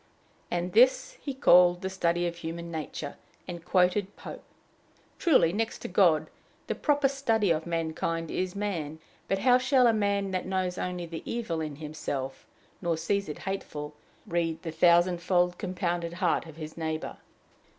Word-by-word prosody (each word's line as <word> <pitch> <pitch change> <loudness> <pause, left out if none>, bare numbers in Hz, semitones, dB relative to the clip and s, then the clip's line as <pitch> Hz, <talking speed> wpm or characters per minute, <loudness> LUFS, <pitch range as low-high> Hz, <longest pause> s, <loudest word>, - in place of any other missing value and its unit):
And 175 +1 -2
this 260 - +4
he 285 - -3
called 180 -7 +5
the 190 - -1
study 175 -2 +1
of 170 0 -3
human 170 0 -6
nature, 155 -2 -5 0.3
and 175 -2 -6
quoted 185 +3 +2
Pope. - - -9 0.8
Truly, 260 - +4
next 225 +2 -1
to - - -3
God, 175 -4 +3 0.3
the - - -2
proper 290 -2 +2
study 225 -8 +1
of 160 +1 0
mankind 165 0 -2
is 185 +1 -2
man; 170 -7 -3 0.3
but 195 - +1
how 250 +5 +4
shall 260 0 +4
a 230 - +5
man 200 -2 0
that 185 -1 -2
knows 185 -1 -1
only 180 -1 -3
the 165 -1 -7
evil 200 -9 -3
in 155 -2 -4
himself, 145 -3 -5 0.3
nor 170 -3 0
sees 195 +3 -1
it 150 - -5
hateful, 150 -6 -4 0.3
read 165 -4 -1
the 165 - -4
thousandfold 175 +1 +3
compounded 175 -3 -2
heart 175 -2 0
of 160 - -11
his 155 -1 -8
neighbor? 160 -1 -4
175 Hz, 160 wpm, -28 LUFS, 165-200 Hz, 0.8 s, called